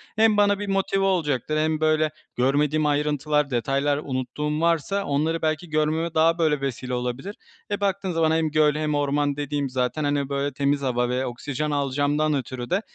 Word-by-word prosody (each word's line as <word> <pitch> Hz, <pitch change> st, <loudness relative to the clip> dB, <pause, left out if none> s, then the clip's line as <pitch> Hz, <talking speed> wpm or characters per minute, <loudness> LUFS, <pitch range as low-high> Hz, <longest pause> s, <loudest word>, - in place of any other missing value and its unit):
Hem 220 Hz, -1 st, +4 dB
bana 205 Hz, -1 st, +3 dB
bir 205 Hz, -, -4 dB
motive 195 Hz, 0 st, +1 dB
olacaktır 155 Hz, -6 st, 0 dB
hem 155 Hz, 0 st, +1 dB
böyle 155 Hz, 0 st, +2 dB, 0.3 s
görmediğim 145 Hz, +4 st, +2 dB
ayrıntılar, 150 Hz, 0 st, +1 dB
detaylar, 135 Hz, +4 st, 0 dB
unuttuğum 145 Hz, +4 st, -3 dB
varsa 170 Hz, +4 st, +1 dB
onları 155 Hz, +3 st, 0 dB
belki 155 Hz, +2 st, -1 dB
görmeme 155 Hz, +2 st, 0 dB
daha 165 Hz, +1 st, +3 dB
böyle 155 Hz, -4 st, +1 dB
vesile 130 Hz, -2 st, -3 dB
olabilir. 125 Hz, -, -3 dB, 0.4 s
E, 205 Hz, -, -1 dB
baktığın 195 Hz, -1 st, 0 dB
zaman 165 Hz, -1 st, +2 dB
hem 160 Hz, -1 st, +1 dB
göl 150 Hz, -1 st, +3 dB
hem 150 Hz, -1 st, -1 dB
orman 145 Hz, 0 st, +1 dB
dediğim 145 Hz, -1 st, -2 dB
zaten, 130 Hz, +4 st, -1 dB
hani, 145 Hz, -1 st, 0 dB
böyle 140 Hz, 0 st, -1 dB
temiz 140 Hz, +1 st, 0 dB
hava 125 Hz, -2 st, 0 dB
ve 125 Hz, +1 st, -1 dB
oksijen 145 Hz, +4 st, -3 dB
alacağımdan 145 Hz, +2 st, +1 dB
ötürü 130 Hz, -2 st, -4 dB
de, 195 Hz, +4 st, +1 dB
150 Hz, 170 wpm, -24 LUFS, 140-160 Hz, 0.4 s, Hem